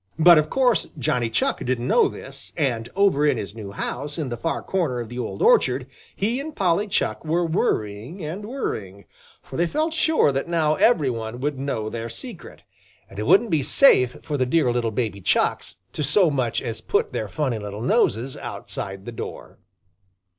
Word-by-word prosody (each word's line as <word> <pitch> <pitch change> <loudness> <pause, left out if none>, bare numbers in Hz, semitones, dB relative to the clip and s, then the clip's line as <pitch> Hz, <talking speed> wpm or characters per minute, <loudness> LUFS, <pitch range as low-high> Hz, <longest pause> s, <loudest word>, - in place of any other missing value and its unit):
But 165 0 +8
of 155 0 -1
course 250 -4 +2
Johnny 120 -3 0
Chuck 115 - 0
didn't 125 -1 -1
know - - +4
this, 135 +1 -9
and 120 -7 -1
over 195 -7 +3
in 150 - +3
his 100 - -5
new 105 -3 -8
house 145 +8 -4
in 150 -5 -2
the 120 - -3
far 165 +8 -3
corner 165 -10 -1
of 115 -2 -5
the 120 +1 -6
old 120 - -3
orchard, 480 +1 +4 0.3
he 225 +6 0
and 300 +2 -6
Polly 190 +2 +1
Chuck 200 - -1
were 170 +2 +1
worrying 155 - -2
and 175 +7 -5
worrying, 105 - -5 0.4
for - - -8
they 170 +1 +2
felt 315 - -1
sure 315 - +3
that 135 +3 -2
now 160 -3 +2
every 155 - +3
one 115 0 -5
would 145 -1 -2
know 135 -6 -2
their 115 +1 -5
secret, 115 - -8 0.5
and 95 - -8
it 105 - -2
wouldn't 225 +3 +5
be 155 -3 +3
safe 130 - +4
for 150 -2 -2
the 130 - +2
dear 135 -2 +2
little 120 -1 0
baby 110 -3 -3
Chucks - - 0 0.2
to 150 - -2
so 165 +4 +4
much 125 -5 -1
as 115 - -4
put 435 +2 0
their - - -2
funny 135 -7 -2
little 105 +1 -6
noses 135 - +1
outside 95 0 -6
the 120 - -6
door. 115 - -8
140 Hz, 190 wpm, -23 LUFS, 115-175 Hz, 0.5 s, But